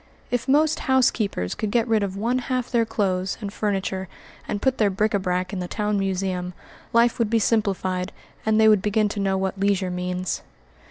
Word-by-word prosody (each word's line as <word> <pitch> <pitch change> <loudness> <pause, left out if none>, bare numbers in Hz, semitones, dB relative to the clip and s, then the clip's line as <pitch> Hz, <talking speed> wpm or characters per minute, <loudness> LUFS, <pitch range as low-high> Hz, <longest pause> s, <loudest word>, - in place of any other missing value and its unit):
If 245 +1 -1
most 300 +3 +3
housekeepers 220 - +2
could 215 - -3
get 230 +2 +1
rid 220 -2 +2
of 195 -1 -3
one 235 +5 0
half 255 -1 -2
their 230 -3 +2
clothes 185 -3 -1
and 205 -3 -5
furniture 195 -2 -2 0.4
and 205 - -2
put 265 +3 0
their 210 -2 +4
bric 210 +3 0
a 200 - +2
brac 185 0 -1
in 190 - -2
the 180 - -3
town 210 +1 -1
museum, 185 -2 -2 0.4
life 235 +1 +3
would 230 -2 +2
be 230 - +3
simplified 195 -4 0 0.3
and 220 0 +2
they 220 - +6
would 210 -3 +5
begin 210 +1 +1
to 205 - -4
know 195 -1 +1
what 190 0 -2
leisure 195 -2 +1
means. 180 0 -2
205 Hz, 200 wpm, -24 LUFS, 190-225 Hz, 0.4 s, they